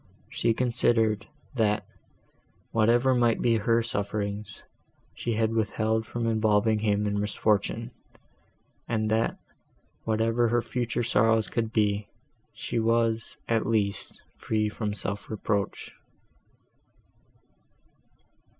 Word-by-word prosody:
She 115 -1 +1
considered, 115 -4 +2 0.3
that, 105 -4 +1 0.9
whatever 120 +4 +3
might 120 -2 +2
be 115 -2 +3
her 115 +2 +2
sufferings, 100 -1 -4 0.5
she 120 - -3
had 110 0 +1
withheld 110 0 0
from 120 -1 -3
involving 110 -1 +2
him 105 -1 +1
in 100 0 0
misfortune, 105 +3 0 1.0
and 110 -1 0
that, 110 +1 +1 0.7
whatever 115 +2 +1
her 120 +1 +1
future 120 -1 -2
sorrows 115 -1 +3
could 115 -2 -2
be, 105 -2 +1 0.5
she - - -2
was, 115 0 +1
at 115 -2 +1
least, 105 -3 -1 0.2
free 105 -1 0
from 105 -1 -3
self 100 -1 -3
reproach. 105 -2 -2
110 Hz, 105 wpm, -27 LUFS, 105-115 Hz, 1.0 s, whatever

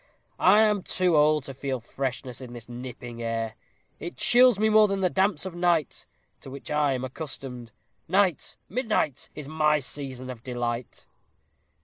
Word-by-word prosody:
I 205 +4 +6
am 210 -2 +3
too 180 -2 +1
old 150 -1 +4
to 135 - -7
feel 135 -1 -3
freshness 130 +1 -5
in 125 -2 -9
this 120 -2 -10
nipping 120 -1 -8
air. 115 -1 -2 0.5
It 170 - -6
chills 240 +2 +6
me 215 +2 +2
more 215 0 +6
than 195 -1 -1
the 185 -2 +2
damps 190 -3 +1
of 190 - -5
night, 175 -4 0 0.3
to - - -11
which 135 +1 -8
I 150 -2 +2
am 130 -1 -3
accustomed. 130 -3 -7 0.4
Night 185 -2 +1
midnight! 215 - -1
is 150 -2 -7
my 155 0 +2
season 130 -2 -5
of 120 -3 -10
delight. 120 -1 -4
145 Hz, 160 wpm, -26 LUFS, 125-185 Hz, 0.5 s, I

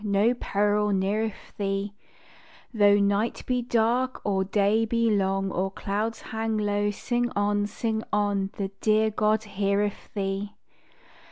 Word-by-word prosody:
No 205 +3 +3
peril 210 -3 +1
neareth 200 +3 -2
thee; 195 0 -2 0.8
Tho 205 -2 +5
night 205 +2 +1
be 250 -1 0
dark 240 +2 +1
or 195 -2 +1
day 205 +3 +2
be 230 0 +1
long, 195 -1 +1
Or 190 +2 -1
clouds 210 +3 -3
hang 220 0 -2
low, 205 0 +1
sing 240 +4 -1
on, 205 0 +1
sing 220 +1 -2
on, 205 -2 +1
The 195 -1 -2
dear 215 0 +3
God 215 +1 +1
heareth 200 0 -1
thee. 200 +1 -3
205 Hz, 135 wpm, -26 LUFS, 200-220 Hz, 0.8 s, Tho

